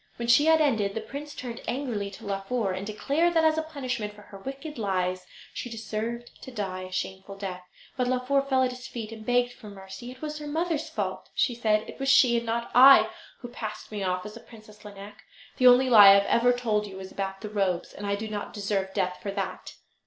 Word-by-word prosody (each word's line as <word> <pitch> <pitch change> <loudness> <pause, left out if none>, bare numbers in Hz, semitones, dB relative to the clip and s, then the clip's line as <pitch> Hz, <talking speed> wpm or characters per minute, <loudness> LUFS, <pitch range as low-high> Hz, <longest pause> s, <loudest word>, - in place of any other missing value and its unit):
When 235 - -5
she 240 +5 +6
had 320 0 +5
ended 220 -9 +1
the - - -1
prince 285 +6 -8
turned 245 -1 -6
angrily 240 -7 -2
to 195 - -12
Laufer, 200 +2 -2
and 190 +2 -5
declared 300 +11 0
that, 325 - +4
as 315 0 +3
a - - +1
punishment 255 -9 -4
for 210 - -14
her 200 -1 -12
wicked 275 +5 -7
lies, 185 -3 -1 0.3
she 245 - -5
deserved 225 +2 -5
to - - -9
die 190 -6 -4
a 185 - -11
shameful 190 +1 -5
death. 190 -2 -5 0.4
But 250 -1 +1
Laufer 255 +2 +1
fell 265 -1 +1
at 255 - +1
his 250 -1 -9
feet 225 -2 -6
and 220 -1 -9
begged 245 +1 +1
for 220 -4 -12
mercy. 195 +3 -10
It 255 - -11
was 305 0 -5
her 300 - -7
mother's 320 +1 -1
fault, - - -4
she 250 - +2
said: 215 -2 +1
"It - - -10
was 270 0 0
she, 265 -3 +6
and 235 0 -3
not 235 +1 -2
I, 270 +2 +8 0.3
who 245 - -6
passed 220 -3 -7
me 210 -1 -4
off 185 -1 -1
as 210 - -7
the 230 - -10
Princess 215 -2 -16
Lineik. 205 0 -11 0.4
The 255 - +5
only 250 +1 +7
lie 215 -5 +9
I - - +10
have 200 0 +3
ever 240 +3 +3
told 220 -4 0
you 195 - -10
was 190 0 -8
about 195 -1 -4
the 210 - -6
robes, 195 -4 -1
and 205 - -6
I 200 - +1
do 215 +2 -5
not 210 -1 -5
deserve 200 -2 -2
death 185 -2 -1
for 205 - -4
that." 195 -1 -5
225 Hz, 235 wpm, -27 LUFS, 200-255 Hz, 0.4 s, I